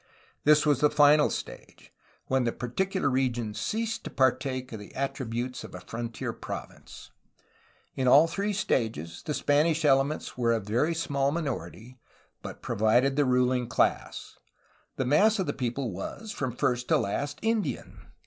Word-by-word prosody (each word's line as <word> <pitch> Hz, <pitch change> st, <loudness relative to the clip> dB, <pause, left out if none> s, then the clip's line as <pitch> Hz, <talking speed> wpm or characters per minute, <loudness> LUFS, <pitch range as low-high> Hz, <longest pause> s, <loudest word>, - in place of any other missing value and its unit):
This 150 Hz, 0 st, +5 dB
was 145 Hz, -3 st, +3 dB
the 150 Hz, -, +5 dB
final 150 Hz, 0 st, +5 dB
stage, -, -, -8 dB, 0.3 s
when 130 Hz, -1 st, +1 dB
the 120 Hz, -, 0 dB
particular 190 Hz, +13 st, -2 dB
region 125 Hz, -5 st, 0 dB
ceased 220 Hz, -, -3 dB
to -, -, -6 dB
partake 130 Hz, -1 st, 0 dB
of 110 Hz, -, -6 dB
the 105 Hz, -, -12 dB
attributes 125 Hz, -2 st, -3 dB
of -, -, -10 dB
a -, -, -7 dB
frontier 115 Hz, 0 st, -5 dB
province. -, -, -9 dB, 0.8 s
In 130 Hz, -1 st, -1 dB
all 140 Hz, +5 st, +7 dB
three 200 Hz, +5 st, -2 dB
stages 110 Hz, -, -2 dB
the 150 Hz, -, -3 dB
Spanish 155 Hz, +2 st, +2 dB
elements 140 Hz, +2 st, +1 dB
were 120 Hz, -2 st, +1 dB
a 115 Hz, -, +1 dB
very 120 Hz, +11 st, 0 dB
small 140 Hz, -4 st, 0 dB
minority, 130 Hz, -, -5 dB, 0.4 s
but -, -, -9 dB
provided 120 Hz, +6 st, +2 dB
the 145 Hz, 0 st, +3 dB
ruHng 125 Hz, -1 st, +2 dB
class. -, -, -1 dB, 0.6 s
The 130 Hz, -, -1 dB
mass 205 Hz, -, +4 dB
of 190 Hz, -, 0 dB
the -, -, -2 dB
people 125 Hz, -1 st, -3 dB
was, 150 Hz, -, -6 dB
from 130 Hz, -, -3 dB
first 125 Hz, 0 st, 0 dB
to -, -, +4 dB
last, 145 Hz, +9 st, -2 dB
Indian. 225 Hz, -1 st, -2 dB
135 Hz, 155 wpm, -28 LUFS, 120-150 Hz, 0.8 s, all